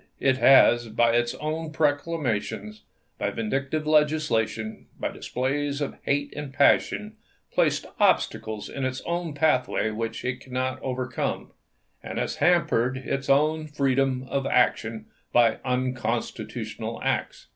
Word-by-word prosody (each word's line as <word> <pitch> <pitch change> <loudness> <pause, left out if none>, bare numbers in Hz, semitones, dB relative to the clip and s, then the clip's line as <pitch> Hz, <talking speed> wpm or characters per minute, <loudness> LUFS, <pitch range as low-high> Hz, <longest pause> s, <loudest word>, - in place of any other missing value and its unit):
It 130 -1 +2
has, 120 -3 +6
by 115 +2 +3
its 120 0 +1 0.4
proclamations, 145 -9 -1 0.4
by - - 0
vindictive 135 +7 -2
legislation, 150 -8 +1
by - - -1
displays 140 +3 -2
of 145 - -4
hate 145 0 0
and 150 -2 -5
passion, 210 +9 +2 0.4
placed - - +2
obstacles 110 -1 +1
in 140 - -5
its 130 0 -2
own 170 -3 -3
pathway 135 -7 +1
which 115 +2 -4
it 125 0 -2
cannot 130 0 -3
overcome, 130 -1 -3 0.5
and - - -6
has - - -2
hampered 130 -8 +2
its 135 +1 -3
own 155 +3 +3
freedom 135 -3 0
of 135 0 -1
action 115 -3 +1 0.3
by 115 -2 +4
unconstitutional 125 -1 -3
acts." - - -2
130 Hz, 120 wpm, -26 LUFS, 120-145 Hz, 0.5 s, has